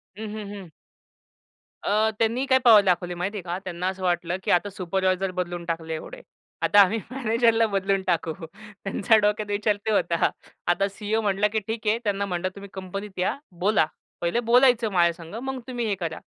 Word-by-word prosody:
हं, 220 +1 -6
हं. 210 -2 -6
हं. 195 -4 -9 1.1
अ, 215 +2 +2
त्यांनी 230 +4 +1
काय 260 -1 +4
पॉवर 225 -4 +8
दाखवली 180 -1 +1
माहिती 185 +4 -3
आहे - - -4
का? 175 0 -3
त्यांना 180 -1 -3
असं 190 0 -4
वाटलं 175 0 0
की - - 0
आता 180 +3 +3
सुपरवायझर 190 0 -1
बदलून 175 -1 -4
टाकले 165 -1 -3
एवढे. - - -7 0.4
आता 205 - +5
आम्ही 200 +3 +3
मॅनेजरला 230 -2 +2
बदलून 195 -1 0
टाकू. 165 -2 0 0.5
त्यांच्या 200 +3 +3
डोक्यात 210 0 +1
विचार 210 +1 +1
ते 220 - +1
होता. 170 -5 +2 0.4
आता 195 +3 +2
सी-ई-ओ 210 +3 -1
म्हटला 200 0 +2
की 220 - +2
ठीक 220 -1 -4
आहे 215 - +3
"त्यांना 200 -1 0
म्हटलं 185 -1 -2
तुम्ही 200 0 -10
कंपनीत 190 +1 -6
या 185 +9 0 0.2
बोला. 200 -2 +3 0.4
पहिले 170 +7 +1
बोलायचं 245 -3 +5
माझ्या 170 -2 +3
संग 165 +3 -11
मग 265 -1 -3
तुम्ही 245 -2 -3
हे 205 - 0
करा." 165 -4 -4
200 Hz, 185 wpm, -25 LUFS, 180-220 Hz, 1.1 s, पॉवर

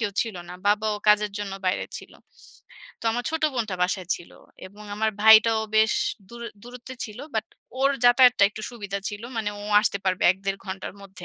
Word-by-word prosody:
কেউ 210 -3 -1
ছিল 225 -4 -7
না, 180 - -8
বাবাও 210 +1 +2
কাজের 210 0 +4
জন্য 205 -1 -5
বাইরে 185 - 0
ছিল, - - -14 0.9
তো - - -12
আমার 245 +1 -3
ছোট 320 0 -3
বোনটা 220 -6 -2
বাসায় 180 -1 -1
ছিল, 175 - -14 0.4
এবং 205 +3 -14
আমার 220 +1 0
ভাইটাও 220 0 +7 0.2
বেশ 220 0 +4 0.4
দূরে 235 +1 -8
দূরত্বে 250 +2 -10
ছিল, 215 0 -9 0.2
বাট 220 0 0 0.4
ওর 275 - +4
যাতায়াতটা 245 -2 +6
একটু 215 0 -9
সুবিধা 205 -4 -5
ছিল, 210 +1 -7
মানে 215 -2 -1
ও - - -8 0.2
আসতে 200 -2 0
পারবে 185 -1 0
১-১.৫ 195 +1 -4
ঘন্টার 190 0 -6
মধ্যে। 190 -2 -12
215 Hz, 180 wpm, -25 LUFS, 200-230 Hz, 0.9 s, ভাইটাও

